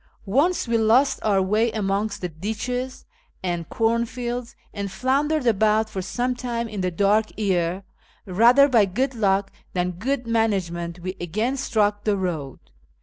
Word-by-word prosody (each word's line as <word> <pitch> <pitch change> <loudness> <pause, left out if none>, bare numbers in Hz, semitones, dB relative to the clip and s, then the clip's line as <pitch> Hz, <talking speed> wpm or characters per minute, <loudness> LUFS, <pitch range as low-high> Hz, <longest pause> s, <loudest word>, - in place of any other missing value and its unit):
Once 280 - +1
we 230 -1 +2
lost 230 +6 +3
our 195 -3 +2
way 215 +4 +1
amongst 200 0 -1
the 180 - -1
ditches 225 +9 -4 0.4
and 175 -2 -3
cornfields, 235 +1 -1 0.2
and 200 -2 -4
floundered 275 +7 0
about 215 0 +2
for 190 - -3
some 245 +7 -1
time 240 -2 -3
in 210 -3 -5
the 185 - 0
dark 205 +5 +2
ere, 185 -3 0 0.4
rather 235 +9 +5
by 235 -6 +4
good 250 +8 -1
luck 200 -3 +1 0.2
than 180 0 0
good 250 +8 -2
management, 185 -7 -1
we 185 +2 -4
again 215 +10 -1
struck 210 -6 0
the 210 -2 +1
road. 160 -8 -3
215 Hz, 145 wpm, -23 LUFS, 190-240 Hz, 0.4 s, rather